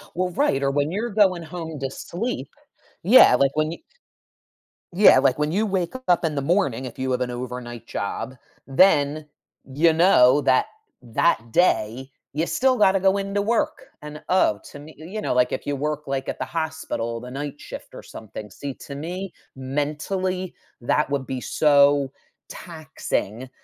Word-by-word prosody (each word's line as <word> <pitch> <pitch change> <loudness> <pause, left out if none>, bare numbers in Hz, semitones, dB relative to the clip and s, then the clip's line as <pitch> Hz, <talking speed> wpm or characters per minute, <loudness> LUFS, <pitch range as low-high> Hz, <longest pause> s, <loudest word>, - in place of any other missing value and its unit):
Well, 180 0 -1
right, 140 -4 +1
or 140 - +2
when 145 +3 0
you're 225 +5 -2
going 190 -5 +3
home 160 -1 -7
to 135 - -2
sleep, 230 - -4 0.6
yeah, 205 - +7
like 135 +1 +3
when 155 +1 0
you - - -10 1.1
Yeah, 180 -8 +7
like, 135 0 +2
when 150 +1 0
you 210 +5 +1
wake 190 -2 -1
up 175 -1 +3
in 155 -2 -1
the 140 - -1
morning, 140 - 0
if 120 - -9
you 130 0 -1
have 125 - 0
an 125 -1 -1
overnight 120 -1 -6
job, 130 +6 -4 0.3
then 150 -1 +3 0.5
you 165 +3 +4
know 145 -6 +5
that 130 -2 +3 0.3
that 115 -1 0
day, 130 -6 +1 0.2
you 160 +3 0
still 255 +4 +1
gotta 195 -2 +4
go 190 +1 +3
into 200 +1 -1
work. 225 +3 -1 0.2
And, 150 0 -9
oh, 180 - +3
to 145 - -10
me, 155 +2 -13
you 185 +8 -7
know, - - -1
like, 125 0 +2
if - - -4
you 145 - -1
work, 150 +1 -3
like, 135 -1 -3
at - - -5
the - - -2
hospital, 160 -8 -3
the 125 +1 -9
night 145 +1 -6
shift - - -10
or - - -10
something. 105 -1 -9
See, 140 -2 -6
to 140 - -8
me, 180 +5 -5 0.2
mentally, 155 +8 -3 0.3
that 140 +4 +1
would 140 -2 -2
be 130 -2 -4
so 145 -2 +3 0.4
taxing, 155 - -5
150 Hz, 175 wpm, -23 LUFS, 130-180 Hz, 1.1 s, yeah